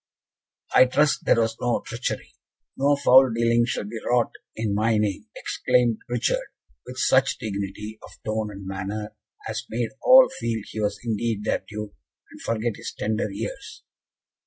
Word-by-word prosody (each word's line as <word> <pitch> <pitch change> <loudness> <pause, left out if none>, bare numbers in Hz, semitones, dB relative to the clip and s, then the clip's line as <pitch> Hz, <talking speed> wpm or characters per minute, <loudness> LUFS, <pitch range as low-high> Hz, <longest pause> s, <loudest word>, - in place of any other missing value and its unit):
"I 130 - +8
trust 145 +3 +2
there - - +4
was 115 0 0
no 120 -1 0
treachery. 115 +3 -4 0.4
No 140 +2 +3
foul 130 -1 +6
dealing 115 +1 +2
shall - - -2
be 110 +2 -6
wrought 120 -1 +2 0.2
in 110 -2 -1
my 110 +2 +2
name," 105 -3 -1
exclaimed 120 -3 +1
Richard, 120 -1 0 0.4
with - - -8
such - - +3
dignity 105 +1 -5
of - - -12 0.2
tone 110 0 -1
and 100 -1 -9
manner, 100 +3 -5 0.3
as - - -3
made 115 0 -2
all 255 0 +8
feel 115 -2 -2
he 110 - -7
was 105 -1 0
indeed 115 -2 -1
their - - 0
Duke, 105 -1 -6 0.4
and - - -13
forget 115 -1 -2
his - - -7
tender 110 0 -1
years. 100 - -7
110 Hz, 160 wpm, -24 LUFS, 105-120 Hz, 0.4 s, I